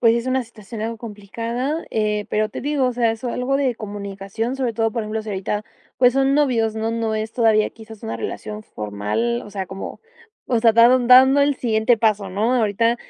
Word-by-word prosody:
pues 230 -1 +5
es 235 +1 -2
una 260 0 +1
situación 220 -1 -10
algo 225 +1 -3
complicada, 230 +7 -4
eh, 210 -1 0
pero 215 0 +1
te - - -7
digo, 285 -2 +1
o 250 - 0
sea, 235 -2 +2
eso 225 +2 -4
algo 260 +3 0
de 265 -4 +1
comunicación, 205 +3 -5
sobre 250 -3 -1
todo, 225 0 0
por 230 - -2
ejemplo, 215 +1 -3
si 220 - -9
ahorita, 205 +1 -3 0.3
pues 250 -1 +5
son 270 +1 +2
novios, 235 -7 +1
no 220 +1 -1
no 225 -1 -1
es 220 +1 -4
todavía 220 -3 +3
quizás 220 -1 -13
una 220 - -3
relación 210 0 -6
formal, 105 - -2
o 205 - -11
sea, 195 -2 -4
como, 190 +1 -7 0.5
o 235 -3 +1
sea, 225 -1 +5
dan 240 +2 +5
dando 265 +2 +7
el 280 -1 +2
siguiente 225 0 +2
paso, 210 -4 +1
¿no?, 220 +6 +1
ahorita, 230 +1 +2
225 Hz, 205 wpm, -21 LUFS, 215-245 Hz, 0.5 s, dando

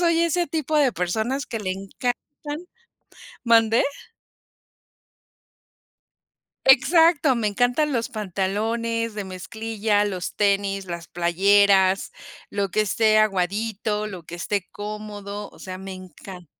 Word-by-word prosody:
soy 335 -1 +3
ese 340 +1 +1
tipo 310 -1 -3
de 275 -4 +3
personas 220 +10 -1
que 225 - -5
le 185 -2 -2
encantan 250 - -5 0.8
¿Mande? 230 -1 +4 2.8
Exacto, 295 +2 +5
me 230 -2 0
encantan 245 +8 +1
los 235 -3 -1
pantalones 220 +3 -2
de 210 -1 -4
mezclilla, 210 +3 -1
los 185 -4 -4
tenis, 195 -1 +1
las 170 -2 -6
playeras, 190 +2 +3 0.4
lo 200 -1 -2
que 215 - +1
esté 215 +1 +3
aguadito, 210 +1 0
lo 185 -5 -7
que 170 - -8
esté 190 +2 -2
cómodo, 205 -1 -7
o - - -18
sea, 185 -1 -7
me 190 0 -8
encan 185 0 -11
210 Hz, 115 wpm, -23 LUFS, 190-235 Hz, 2.8 s, Exacto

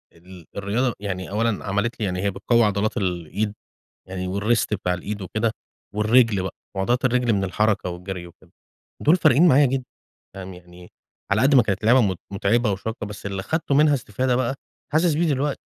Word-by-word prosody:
ال 90 0 -14
الرياضة 110 +5 0
يعني 95 -3 -4
أولًا 110 +1 -1
عملت 100 +5 -1
لي 105 - 0
يعني 90 -1 -2
هي 100 - +1
بتقوى 115 +5 +2
عضلات 105 +1 0
الإيد، 95 +3 -2 0.6
يعني 95 +1 -3
والWrist 115 +2 +2
بتاع 90 -3 0
الإيد 100 +3 -5
وكده، 110 +4 -1 0.4
والرجل 110 -2 +3
بقى 95 - -5 0.2
وعضلات 120 +7 0
الرجل 125 -2 +2
من 100 -1 +1
الحركة 100 0 0
والجري 90 0 -6
وكده، 85 - -19 0.5
دول 160 +5 +5
فارقين 155 +1 +5
معايا 140 0 +6
جدًا، 130 0 -1 0.5
فاهم؟ 95 -1 -8
يعني 90 0 -15 0.4
على 110 +5 +3
قد 140 +1 +4
ما 125 - +7
كانت 105 0 -2
لعبة 125 +3 +6
مت 95 -5 0
متعبة 105 +2 +1
وشاقة 110 +3 -5
بس 105 0 -8
اللي 95 -1 -3
خدته 160 - -1
منها 150 0 +5
استفادة 125 +1 -1
بقى 130 +1 0 0.4
حاسس 160 0 +3
بيه 165 +1 +1
دلوقتي، 140 0 -1
105 Hz, 180 wpm, -23 LUFS, 95-125 Hz, 0.6 s, ما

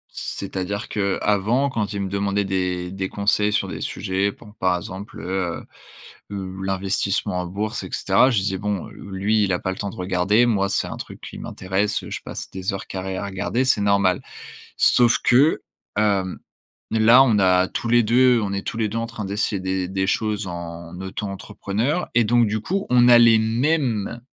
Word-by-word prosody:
c'est-à-dire 100 +1 -4
qu'avant 105 +6 +1
quand 105 -4 -2
il 100 - -3
me 100 - -2
demandait 100 0 0
des 90 -2 -2
des 95 0 -3
conseils 105 +1 +1
sur 105 - 0
des - - -6
sujets, 95 +1 -1
bon 105 0 -16
par 95 -1 +2
exemple, 95 +3 -8
heu, 90 -2 -3 0.6
l 100 - -5 0.3
l'investissement 95 -1 -1
en 90 - -3
bourse 105 +4 -3
et - - -7
cetera, 130 - +3
je 120 - +1
disais: 95 0 -1
«Bon, 105 -3 -2
lui 100 +2 -1
il 95 - 0
a 90 - +1
pas 95 - -2
le 95 - -6
temps 100 - -3
de - - -10
regarder, 95 +5 +2
moi 100 -5 +1
c'est - - 0
un - - -6
truc - - -9
qui - - -9
m'intéresse, 95 +3 -2
je - - -5
passe - - -7
des 95 +1 -3
heures 95 - -6
carrées 95 0 -4
à 100 - -3
regarder, 100 +6 -1
c'est 110 -5 +2
normal». 100 -2 +2 0.6
Sauf 120 -1 +5
que, 135 +6 +4 0.4
hem, 100 -3 +1 0.5
là, 115 +4 +6
on 115 -6 +3
a 95 -1 +4
tous 115 - -4
les 120 +1 +5
2, 120 +2 +4
on 100 - -2
est 100 0 -3
tous 115 - -4
les 110 -2 0
2 110 - -4
en 115 - -1
train 115 -3 -6
d'essayer 100 0 -1
des 95 -1 -1
des 95 0 -1
choses 105 0 -1
en 85 0 -7
auto-entrepreneur 100 - -3
et 120 - +5
donc 120 +1 +3
du 110 +1 -1
coup, 195 - -2
on 125 -1 +5
a 120 -1 +8
les 115 -1 +7
mêmes 120 -1 0
100 Hz, 190 wpm, -22 LUFS, 95-110 Hz, 0.6 s, a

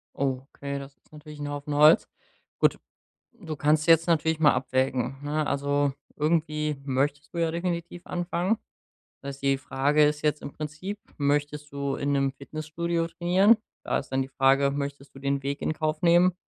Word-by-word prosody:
Oh, 130 -2 -1
okay, 140 0 -4
das 140 0 -10
ist - - -35
natürlich 150 0 -11
’n 145 - -3
Haufen 145 0 -4
Holz. 150 +2 +6 0.5
Gut, - - +3 0.6
du 170 -10 -7
kannst 150 +2 +2
jetzt 165 0 +6
natürlich 160 -1 +2
mal 150 -2 +6
abwägen, 130 0 0
ne? 150 +1 -1
Also, 145 0 +1 0.2
irgendwie 150 -1 0
möchtest 140 +2 -1
du 170 - -3
ja 165 -1 +1
definitiv 170 0 -3
anfangen. 175 +4 -1 0.6
Das 140 -1 -6
heißt, - - -21
die 135 0 +3
Frage 145 +3 +2
ist 150 0 0
jetzt 150 0 0
im - - -7
Prinzip: 155 +8 -6 0.2
Möchtest 145 +1 -1
du 140 -1 -2
in 140 +1 -1
’nem 135 -1 +2
Fitnessstudio 160 +4 -3
trainieren? 185 +6 +4 0.3
Da - - 0
ist 135 - -6
dann 135 - +1
die 135 - -3
Frage: 135 +1 +3
Möchtest 140 -1 -5
du - - -10
den 140 0 -1
Weg 140 +1 -3
in 155 - 0
Kauf 155 0 -2
nehmen 175 +1 +5
150 Hz, 180 wpm, -27 LUFS, 140-160 Hz, 0.6 s, Holz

